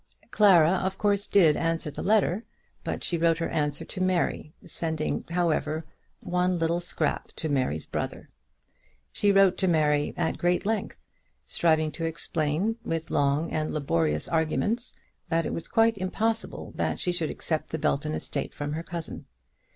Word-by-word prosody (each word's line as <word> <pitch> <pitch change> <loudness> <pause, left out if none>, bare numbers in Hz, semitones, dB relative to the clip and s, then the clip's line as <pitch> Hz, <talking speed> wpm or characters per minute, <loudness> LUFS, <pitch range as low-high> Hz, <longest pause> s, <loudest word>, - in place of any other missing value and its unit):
Clara, 175 -6 +6
of 190 +1 -2
course, 205 -1 +1
did 165 -7 +5
answer 165 -2 -1
the - - -6
letter; 210 -1 +2 0.4
but - - -3
she 170 - 0
wrote 165 -1 +3
her 165 - -2
answer 145 -1 -1
to 185 - -5
Mary, 185 -4 0
sending, 160 -3 -2
however, 160 -2 0 0.4
one 180 0 +1
little 165 +1 +1
scrap 175 - -2
to 160 - -3
Mary's 130 - 0
brother. - - -4 0.8
She 205 - +2
wrote 195 -2 +5
to 190 - +2
Mary 150 -3 +2
at - - -1
great 175 +1 +1
length, 220 0 -1 0.5
striving 155 -2 +2
to 165 +2 -4
explain, 165 +5 -1
with 165 -1 -3
long 145 +3 +1
and 155 0 -1
laborious 80 - 0
arguments, 205 +9 0 0.3
that 165 0 +1
it - - -2
was 165 - -4
quite 225 -1 +3
impossible 220 +4 -2
that - - -1
she 180 - 0
should 170 -3 -1
accept 160 -2 -2
the 160 - -2
Belton 150 0 0
estate - - -4
from 145 0 -3
her 160 - -3
cousin. 170 -1 -6
165 Hz, 160 wpm, -27 LUFS, 155-185 Hz, 0.8 s, Clara